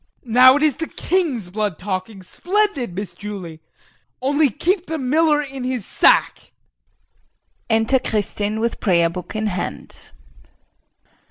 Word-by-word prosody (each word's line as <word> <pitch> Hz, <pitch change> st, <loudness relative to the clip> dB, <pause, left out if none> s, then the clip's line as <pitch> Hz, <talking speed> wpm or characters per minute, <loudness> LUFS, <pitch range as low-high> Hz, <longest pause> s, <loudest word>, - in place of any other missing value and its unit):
Now 255 Hz, +3 st, +6 dB
it 295 Hz, -, 0 dB
is 300 Hz, -4 st, +2 dB
the 325 Hz, +1 st, -4 dB
king's 290 Hz, -, -2 dB
blood 205 Hz, -4 st, -2 dB
talking. 190 Hz, +1 st, -5 dB
Splendid, 350 Hz, -, -1 dB
Miss 195 Hz, -2 st, -5 dB
Julie! 185 Hz, -4 st, -8 dB, 0.6 s
Only 285 Hz, +3 st, +2 dB
keep 355 Hz, -, -1 dB
the 320 Hz, -, -3 dB
miller 295 Hz, +2 st, +2 dB
in 270 Hz, -2 st, -7 dB
his 250 Hz, -5 st, -3 dB
sack. -, -, +2 dB, 1.2 s
[Enter 225 Hz, +4 st, +2 dB
Kristin 210 Hz, -1 st, -1 dB
with 230 Hz, +1 st, -2 dB
prayer 170 Hz, -4 st, +2 dB
book 180 Hz, +4 st, -8 dB
in 215 Hz, 0 st, -2 dB
hand. 185 Hz, -4 st, -5 dB
230 Hz, 125 wpm, -20 LUFS, 200-290 Hz, 1.2 s, Now